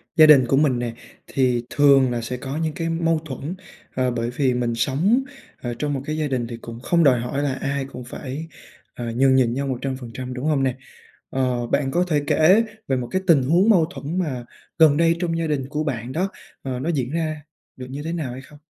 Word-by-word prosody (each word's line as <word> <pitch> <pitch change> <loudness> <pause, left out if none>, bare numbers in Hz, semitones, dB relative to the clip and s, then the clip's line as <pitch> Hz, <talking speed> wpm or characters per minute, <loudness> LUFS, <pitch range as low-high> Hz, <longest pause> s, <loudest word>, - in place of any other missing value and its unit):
Gia 160 -2 +8
đình 145 -4 +7
của 135 - +2
mình 135 -4 +3
nè, 120 -1 -3 0.3
thì 125 -3 +1
thường 140 -3 +5
là 120 -1 -2
sẽ 125 +2 -4
có 135 +3 -5
những 160 -1 -1
cái 165 +2 -3
mâu 165 -1 +1
thuẫn, 145 +4 -5 0.4
à, 130 -1 +1
bởi 120 -1 -2
vì 130 +1 +1
mình 120 -1 -1
sống, 155 - +2 0.4
à, 120 -1 -3
trong 145 -1 -1
một 135 - -2
cái 155 +1 -3
gia 155 -1 0
đình 125 -4 -1
thì 115 0 -6
cũng 115 0 -9
không 170 +7 +2
đòi 130 -5 +5
hỏi 130 +4 -2
là 140 -2 0
ai 140 +1 -2
cũng 125 -2 -9
phải, 135 +5 -6 0.5
à, 120 -1 -5
nhường 130 +1 +4
nhịn 120 -3 +3
nhau 140 +1 -2
100%, 130 -1 -4
đúng 125 +3 -5
hông 150 -3 +2
nè? 130 -2 +1 0.5
Ờ, 125 -2 -1
bạn 140 0 0
có 175 +4 +2
thể 150 -4 +1
kể 185 +8 +5 0.2
về 135 - +1
một 125 -1 -3
cái 185 - 0
tình 145 -6 +5
huống 175 - +3
mâu 175 -7 +5
thuẫn 170 0 -5
mà 130 -8 -3 0.3
gần 155 -3 +6
đây 165 +1 +3
trong 170 -2 -1
gia 165 -1 -1
đình 145 -4 -1
của 150 +1 -2
bạn 125 -5 -3
đó, 185 +8 -1 0.3
ờ, 130 -2 -4
nó 145 +6 -2
diễn 135 -6 -1
ra 155 -2 -2 0.3
được 125 -1 -8
như 140 +2 -5
thế 165 +2 -3
nào 150 -7 -3
hay 130 - -7
không? 145 +2 -16
135 Hz, 235 wpm, -22 LUFS, 125-155 Hz, 0.5 s, Gia